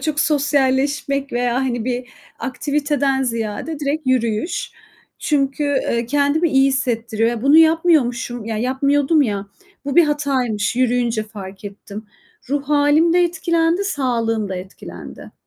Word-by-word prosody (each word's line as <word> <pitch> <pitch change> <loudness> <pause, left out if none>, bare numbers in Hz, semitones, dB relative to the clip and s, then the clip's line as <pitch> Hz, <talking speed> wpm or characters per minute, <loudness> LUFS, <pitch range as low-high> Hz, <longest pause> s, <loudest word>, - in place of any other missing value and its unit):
çok 305 -2 -1
sosyalleşmek 280 -1 0
veya, 240 0 0
hani, 245 -3 -1
bir 250 -1 -3 0.3
aktiviteden 280 0 -1
ziyade 230 +5 -3
direkt 290 0 -2
yürüyüş. 235 +3 -1 0.5
Çünkü, 285 0 0
eee, 260 -4 0
kendimi 290 +5 +1
iyi 270 -1 +4
hissettiriyor. 235 -4 0
Ya, 235 -1 -4
bunu 285 +3 +5
yapmıyormuşum, 305 -8 +3
ya 220 -1 -3
yapmıyordum 280 +5 +2
ya, 205 -5 -2 0.4
bu 280 -1 -3
bir 345 - +7
hataymış, 265 -8 -1
yürüyünce 245 -3 +1
fark 200 -2 -10
ettim. 205 +1 -9 0.4
Ruh 285 0 0
hâlim 295 +3 +3
de 355 0 +4
etkilendi, 340 +1 0
sağlığım 230 - -1
da 190 - -4
etkilendi. 185 +1 -10
265 Hz, 130 wpm, -19 LUFS, 235-290 Hz, 0.5 s, bir